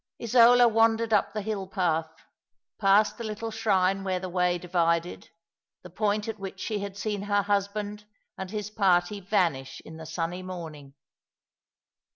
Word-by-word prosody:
Isola 240 +1 +6
wandered 225 0 +2
up 205 - +2
the 210 0 -4
hill 200 -2 -3
path, 165 -5 0 0.7
past 205 +2 +3
the - - -4
little 220 +1 -5
shrine 195 -3 +1
where 185 -1 -1
the 185 0 -6
way 180 0 +1
divided, 170 -1 -1 0.5
the 180 - -11
point 210 +2 -1
at 220 -2 -5
which 195 -1 -7
she 215 0 -3
had 200 -1 -6
seen 205 -1 -3
her 205 0 +1
husband 205 +1 -2 0.3
and 190 -1 -6
his 210 0 -5
party 195 -1 +2
vanish 175 -9 -1
in 160 - -10
the 160 -1 -9
sunny 165 +3 -3
morning. 160 -7 -9
195 Hz, 155 wpm, -27 LUFS, 180-215 Hz, 0.7 s, Isola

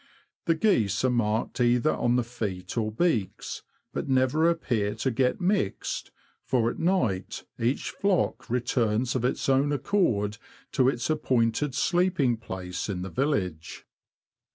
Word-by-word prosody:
The 165 - +3
geese 125 - +2
are 130 - +3
marked 115 0 0
either 120 +5 +3
on 120 0 +1
the 125 - +2
feet 100 -6 -5
or 110 -2 0
beaks, 115 - -1 0.3
but - - -3
never 135 +5 +3
appear 115 -11 0
to 130 +4 -1
get 125 +2 +1
mixed, 180 - -1 0.3
for 120 -3 +1
at - - -9
night 165 - 0 0.2
each 120 +4 0
flock 195 -3 0
returns 120 -1 0
of 125 - 0
its 125 - 0
own 135 +2 +3
accord 115 - 0 0.3
to 130 -1 +3
its 120 -3 -2
appointed 130 -2 +1
sleeping 160 -4 +2
place 95 -3 -5
in 90 -2 -3
the 95 - -6
village. 95 - -2
125 Hz, 140 wpm, -27 LUFS, 110-145 Hz, 0.3 s, The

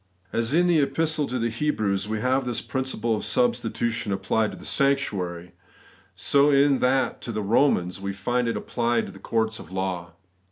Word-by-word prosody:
As 115 +2 0
in 175 +4 +4
the 175 -3 +4
Epistle 155 +1 +1
to 125 - -3
the 115 -1 -1
Hebrews 110 -7 -1
we 110 0 -2
have 130 +2 +2
this 125 -2 -2
principle 130 -4 -2
of 105 - -4
substitution 120 -2 0
applied 100 +3 0
to - - -9
the - - -11
sanctuary, 95 - 0 0.6
so 140 +1 +3
in 140 -1 +4
that 130 -1 +1
to 120 - -5
the 110 -1 -3
Romans 100 -5 +2
we 100 0 -2
find 120 +5 -1
it 115 - -1
applied 120 -1 0
to - - -9
the - - -13
courts 110 0 -1
of 90 - -12
law. 95 -3 -3
115 Hz, 185 wpm, -25 LUFS, 100-135 Hz, 0.6 s, in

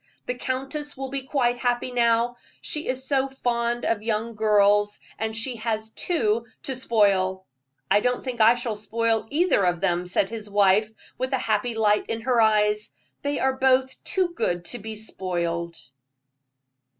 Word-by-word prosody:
"The 250 - -1
countess 270 +4 -4
will 270 0 -4
be 270 -1 -5
quite 245 -4 +1
happy 245 +1 0
now; 235 0 +2 0.2
she 300 +1 -3
is 260 +1 -1
so 275 -1 +2
fond 240 -2 -1
of 225 -2 0
young 225 +1 -2
girls, 205 -1 +3 0.2
and 220 0 -2
she 235 +1 -2
has 220 -1 -3
two 235 -9 0 0.2
to 265 - -3
spoil." 195 -6 +2 0.5
"I 205 - +6
don't 250 +3 0
think 250 -3 -3
I 225 +2 +7
shall 240 -2 -3
spoil 225 +1 -1
either 325 - +2
of 175 -1 +1
them," 180 -1 0
said 190 +1 +1
his 220 -2 -7
wife, 205 +1 +3 0.3
with 260 +1 -2
a - - +3
happy 225 -1 -1
light 210 -1 +2
in 225 - -2
her 240 -1 +2
eyes; 210 -1 +2 0.3
"they 285 0 -1
are 265 0 +1
both 260 0 +1
too 375 -2 0
good 175 - -2
to 245 - -6
be 220 +1 -7
spoiled." 170 -5 -3
230 Hz, 165 wpm, -25 LUFS, 210-255 Hz, 0.5 s, I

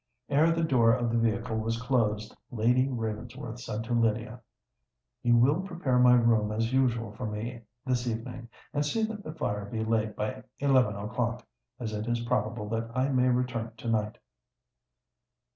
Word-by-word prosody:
Ere 155 +4 +4
the 165 0 +1
door 125 -7 +4
of 120 -2 -1
the 115 - +1
vehicle 115 0 0
was 115 +1 -1
closed, 110 -4 0
Lady 125 +3 +2
Ravensworth 120 +1 -5
said 115 -3 -4
to 120 +2 -3
Lydia, 115 -1 0 0.8
"You 120 0 +4
will 140 +9 +4
prepare 170 -9 0
my 125 0 +7
room 115 -3 +3
as 115 +3 -1
usual 120 -4 +1
for 110 +3 -5
me 115 +3 -5 0.2
this 125 -1 0
evening—and 120 +4 -4
see 220 +10 0
that 220 -2 -3
the 155 +1 -7
fire 105 -9 -2
be 110 +2 -3
laid 110 -1 0
by 105 0 -3 0.2
eleven 130 -7 +3
o'clock—as 115 +1 -5
it 105 +1 -3
is 120 0 0
probable 110 -1 -1
that 115 +1 -2
I 130 +2 +2
may 130 -2 +3
return 125 -2 -1
to 115 - -5
night." 105 -1 0
120 Hz, 160 wpm, -29 LUFS, 110-125 Hz, 0.8 s, my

